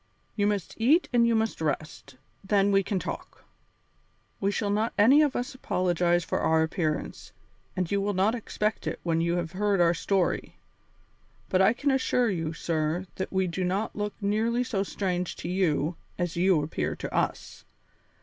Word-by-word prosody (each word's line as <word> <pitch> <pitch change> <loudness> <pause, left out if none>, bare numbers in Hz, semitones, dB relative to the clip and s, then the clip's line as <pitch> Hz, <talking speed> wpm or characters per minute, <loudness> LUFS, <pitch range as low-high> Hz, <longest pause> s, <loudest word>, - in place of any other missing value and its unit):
You 205 -2 +1
must 205 -4 -2
eat 285 +10 +3
and 235 -1 +4
you 230 - +2
must 220 -5 -1
rest, 150 -2 -3 0.3
then 200 0 +2
we 195 0 +4
can 195 +1 -2
talk. - - -6 1.0
We 195 - +1
shall 205 0 -1
not 215 +3 0
any 260 +9 +6
of 295 -3 +2
us 245 +3 -3
apologize 175 -7 +1
for - - -2
our 160 0 +3
appearance, 160 -2 -3 0.4
and 180 -2 -2
you 200 0 +1
will 205 0 -1
not 195 +4 +2
expect 215 -2 -2
it - - -3
when 165 -1 +1
you 170 +1 +1
have 170 -2 -2
heard 200 +1 +1
our 170 -1 +4
story. 185 +2 -1 0.9
But 185 - +3
I 195 +4 +5
can 280 +4 0
assure 250 -3 +2
you, 165 -4 -2
sir, 165 +1 -1
that 190 - -3
we 190 -1 +1
do 180 +1 -3
not 190 +4 -1
look 210 0 -3
nearly 225 +4 +1
so 220 -5 -2
strange 180 -3 -2
to - - -7
you 175 -3 0 0.2
as 175 -2 -2
you 175 -3 +3
appear 150 - -2
to - - -6
us. - - -2
190 Hz, 180 wpm, -27 LUFS, 170-215 Hz, 1.0 s, any